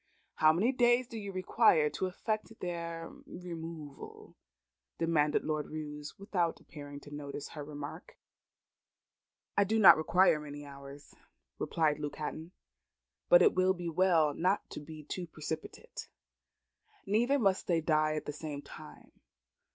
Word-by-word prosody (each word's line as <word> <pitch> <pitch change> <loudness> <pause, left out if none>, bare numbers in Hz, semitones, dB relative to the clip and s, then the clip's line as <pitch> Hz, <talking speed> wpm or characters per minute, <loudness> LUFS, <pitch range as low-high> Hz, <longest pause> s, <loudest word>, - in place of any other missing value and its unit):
"How 155 0 +6
many 195 +10 +2
days 245 -1 +3
do 235 - -10
you 200 -1 -6
require 185 -4 +4
to 190 - -2
effect 215 +4 -3
their 170 -1 -4 0.2
removal?" 165 -4 -8 0.6
demanded 155 -3 +2
Lord 155 -1 -2
Roos, 150 -1 -7
without 180 -4 -1
appearing 145 -2 -10
to 145 - -12
notice 145 -1 -6
her 150 - -7
remark. 145 0 -8 1.4
"I 200 - +5
do 215 +3 0
not 190 -6 +9
require 170 +1 +4
many 145 -1 -8
hours," 140 0 -11 0.5
replied 155 -2 +1
Luke 145 -1 -4
Hatton; 160 +2 -5 0.8
"but - - +8
it 440 - +5
will 185 +1 +3
be 175 -1 -4
well 165 -3 +3
not 185 +6 0
to - - -6
be 155 +1 -10
too 175 +4 -5
precipitate. 160 0 -7 1.0
Neither 240 +7 +2
must 195 -7 +1
they 170 -3 +3
die 155 -1 +2
at 155 - -4
the 150 - -4
same 150 -2 -6
time. - - -12
165 Hz, 140 wpm, -32 LUFS, 150-185 Hz, 1.4 s, not